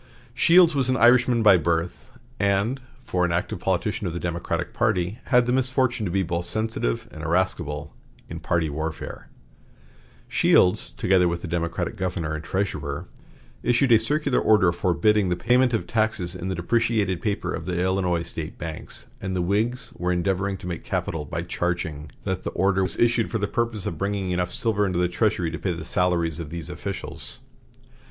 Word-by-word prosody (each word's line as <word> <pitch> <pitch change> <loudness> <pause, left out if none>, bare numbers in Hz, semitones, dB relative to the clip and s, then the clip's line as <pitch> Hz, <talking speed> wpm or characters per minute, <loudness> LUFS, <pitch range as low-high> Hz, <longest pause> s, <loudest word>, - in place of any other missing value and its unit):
Shields 170 -1 +6
was 135 -3 0
an 130 - +2
Irishman 120 -1 +5
by 100 -4 +7
birth, 85 +1 -2 0.3
and, 100 +6 +1 0.2
for 95 -6 -1
an 90 - +1
active 85 - -1
politician - - -1
of 85 - -3
the 85 - -3
Democratic 85 -1 -3
party, 105 -3 0
had 125 -1 +4
the 120 - 0
misfortune 130 -4 +1
to - - -3
be 95 +1 +1
both 85 0 -2
sensitive 110 - -1
and 80 - -9
irascible 80 -3 -1 0.3
in - - -7
party 85 -2 0
warfare. 80 +2 -5 1.0
Shields, 90 - +3
together 90 -1 +3
with 85 0 -2
the - - -4
Democratic 85 +4 -2
governor 90 -4 -2
and 80 0 -5
treasurer, 80 -6 -3 0.5
issued 125 +1 +2
a 115 - +7
circular 145 +3 +1
order 105 -5 +4
forbidding 95 +3 +2
the 90 - +1
payment 125 +7 +3
of 115 - -1
taxes 110 -6 0
in 90 0 -5
the 95 - -2
depreciated 100 0 0
paper 105 -2 -2
of 85 - -5
the 90 -1 -1
Illinois 90 -2 +1
State 80 -1 -6
banks, 80 -2 -6 0.2
and 95 -1 -3
the 90 - 0
Whigs 110 +7 -1
were 90 +1 -1
endeavoring 95 +2 0
to - - -11
make 85 -2 -5
capital 75 -2 -2
by 85 +3 -4
charging 80 -4 -3
that 95 -2 -2
the - - -3
order 95 +1 +2
was 95 -3 +2
issued 115 -1 +2
for 115 - -1
the 100 -1 -1
purpose 115 -3 -2
of 85 - -4
bringing 100 -2 -1
enough 90 0 -1
silver 110 -3 0
into 90 -2 -1
the 90 0 +2
treasury 90 -2 0
to 80 - -5
pay 95 - -1
the 80 -1 -7
salaries 85 -3 0
of 80 -3 -6
these 85 +1 -5
officials. 100 +2 -6
95 Hz, 180 wpm, -24 LUFS, 85-110 Hz, 1.0 s, by